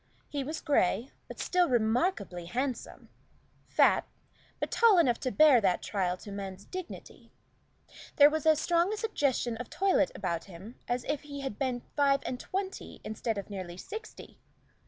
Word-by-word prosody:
He 285 -2 -2
was 305 +4 -5
gray, 260 -2 +1 0.2
but - - -10
still 360 -2 +2
remarkably 225 - 0
handsome; 255 +6 -4 0.6
fat, - - +3 0.5
but - - -3
tall 455 -4 +5
enough 250 -9 +3
to 255 - -2
bear 295 -5 +6
that 190 -3 +1
trial 185 -3 -1
to 205 - -10
man's 195 -1 -6
dignity. 370 -2 -9 0.8
There 290 0 +7
was 315 0 -1
as 310 -1 +5
strong 345 +3 +2
a 430 - -2
suggestion 280 - 0
of 245 0 -7
toilette 380 -7 +2
about 170 -4 -3
him 195 +6 -12
as 245 0 -1
if 295 - -2
he 285 -1 -7
had 265 -7 -5
been 255 -3 -1
five 280 -1 +3
and 250 - -3
twenty 385 +4 -5
instead 220 0 -3
of 200 +1 -6
nearly 185 -3 -6
sixty. 435 - -9
260 Hz, 160 wpm, -30 LUFS, 205-310 Hz, 0.8 s, There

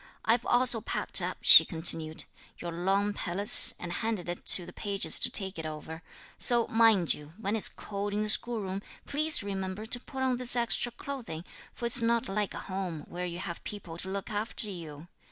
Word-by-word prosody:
"I've 230 +2 -1
also 245 -2 +5
packed - - -1
up," - - -5
she - - +10
continued, 160 -2 +1 0.3
"your 175 - -8
long 195 +4 -2
pelisse, 200 +2 +5
and 175 0 -8
handed 215 -4 -5
it 175 - -8
to 180 - +5
the 175 - -13
pages 200 -2 +3
to - - +1
take 190 -4 -2
it 160 - -7
over; 155 +1 -10 0.4
so 240 -2 +4
mind, 225 -6 +2 0.3
when 215 -1 -4
it's 220 - +3
cold 205 0 -7
in 210 +1 -3
the 215 - -2
school 235 +1 +3
room, 190 0 -6 0.2
please 305 -4 0
remember 195 +1 -6
to 245 +2 -4
put 265 +1 -8
on 255 -1 -1
this 245 0 0
extra 240 0 0
clothing, 240 - -9 0.3
for 240 - -9
it's 235 +1 +4
not 230 0 -1
like 205 +1 -4
home, 185 -5 -7
where 180 +1 -6
you 170 0 -8
have 175 -2 -8
people 185 -6 -10
to 190 - -5
look 195 +1 -7
after 215 +1 -5
you. 160 -3 -11
200 Hz, 190 wpm, -27 LUFS, 175-230 Hz, 0.4 s, she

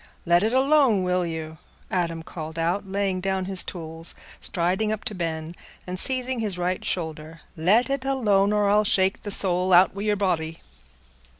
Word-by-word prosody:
"Let 175 0 +4
it 220 +2 +1
alone, 265 -6 +4
will 180 -1 0
you?" 160 -1 -6 0.3
Adam 170 -3 -1
called 160 -1 -7
out, 175 +5 -1
laying 195 -1 -1
down 190 0 -1
his 190 -1 -1
tools, 165 -1 -7 0.2
striding 185 +5 0
up 215 -1 -3
to - - -3
Ben, 165 -3 -4 0.3
and 180 0 -2
seizing 255 0 0
his 210 -5 -2
right 180 +1 -1
shoulder. 160 -1 -4
"Let 195 +10 +3
it 275 -1 -2
alone, 210 -7 +2
or 210 -1 +2
I'll 210 +1 +4
shake 190 -2 +3
the 205 - -6
soul 185 -2 0
out 180 +1 +7
o' - - -6
your 210 0 +1
body." 165 -5 -1
185 Hz, 175 wpm, -25 LUFS, 170-210 Hz, 0.3 s, out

